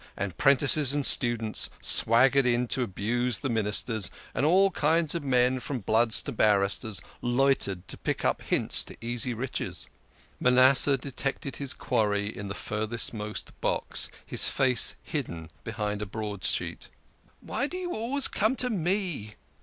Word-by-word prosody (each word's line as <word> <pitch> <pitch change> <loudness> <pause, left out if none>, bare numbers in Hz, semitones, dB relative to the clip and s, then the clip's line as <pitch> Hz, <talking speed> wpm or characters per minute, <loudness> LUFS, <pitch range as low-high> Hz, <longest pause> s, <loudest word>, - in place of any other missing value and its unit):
and 95 -3 -4
'prentices 140 +1 +4
and 145 -2 -1
students 115 -3 +3
swaggered 130 +4 +5
in 120 0 0
to 130 - +1
abuse 120 +3 -1
the 135 - -4
Ministers, 110 -1 +1 0.2
and - - -2
all 190 +4 +3
kinds 160 -1 +2
of 170 -3 -4
men 130 -1 +1
from 135 +2 -5
bloods 110 +2 +1
to - - -5
barristers 100 -1 +1 0.2
loitered 120 -7 0
to - - -3
pick - - -4
up - - 0
hints - - +3
to - - -12
easy 120 +2 -2
riches. 130 +3 -5 0.5
Manasseh 130 +2 +4
detected 135 +1 -5
his 140 -2 -2
quarry 105 -1 -2
in 100 - -7
the 100 - -6
furthermost 105 0 -4
box, - - 0 0.2
his - - +2
face 130 -3 +1
hidden 85 - -6
behind 105 -2 -4
a 105 - -5
broadsheet. 105 -2 -4 0.3
" - - -35
Why 280 - -3
do 365 - -7
you 355 -1 -5
always 250 +5 -2
come 220 +5 0
to 250 -1 -1
me 175 - -3
125 Hz, 150 wpm, -26 LUFS, 105-140 Hz, 0.5 s, swaggered